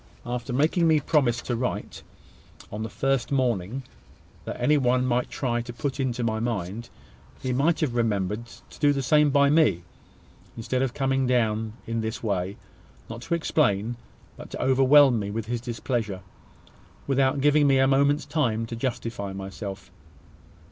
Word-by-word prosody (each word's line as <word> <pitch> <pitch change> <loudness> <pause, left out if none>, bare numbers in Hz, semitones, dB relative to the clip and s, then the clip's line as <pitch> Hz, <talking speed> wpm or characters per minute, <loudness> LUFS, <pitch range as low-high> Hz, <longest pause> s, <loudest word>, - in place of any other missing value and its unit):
After 125 +2 -4
making 155 +6 +2
me 160 -1 +4
promise 135 -5 +1
to 120 - -2
write, 125 +2 -4 0.7
on 105 - -5
the 110 - -4
first 135 0 0
doubt 125 -8 +1 0.8
that - - -6
any 150 - +3
one 125 -2 +2
might 125 0 0
try 120 -3 -1
to 120 - -7
put 135 +3 -4
into 125 -2 -1
my 110 -1 0
mind, 115 0 -3 0.5
he 130 - -2
might 155 +6 +1
have 145 -6 0
remembered 110 -1 -1 0.2
to - - -14
do 145 -1 +4
the 135 -1 -2
same 150 +3 +4
by 140 0 +4
me, 110 - +3 0.7
instead 125 +3 -2
of 135 -2 -1
coming 135 -1 +1
down 110 -3 0
in 115 0 -2
this 110 +1 -4
way, 100 -2 -2 0.5
not 115 +1 -7
to 170 +7 -1
explain, 120 -9 +1 0.4
but - - -10
to - - -7
overwhelm 135 -1 +5
me 100 -1 -3
with 110 +1 -3
his 120 +1 -3
displeasure, 115 -5 -3 0.8
without 135 0 +1
giving 145 +1 +4
me 135 -1 +4
a 135 - +4
moment's 140 +2 +2
time 115 -8 0
to 115 - -6
justify 115 -5 -4
myself. 95 +1 -7
125 Hz, 160 wpm, -25 LUFS, 115-135 Hz, 0.8 s, overwhelm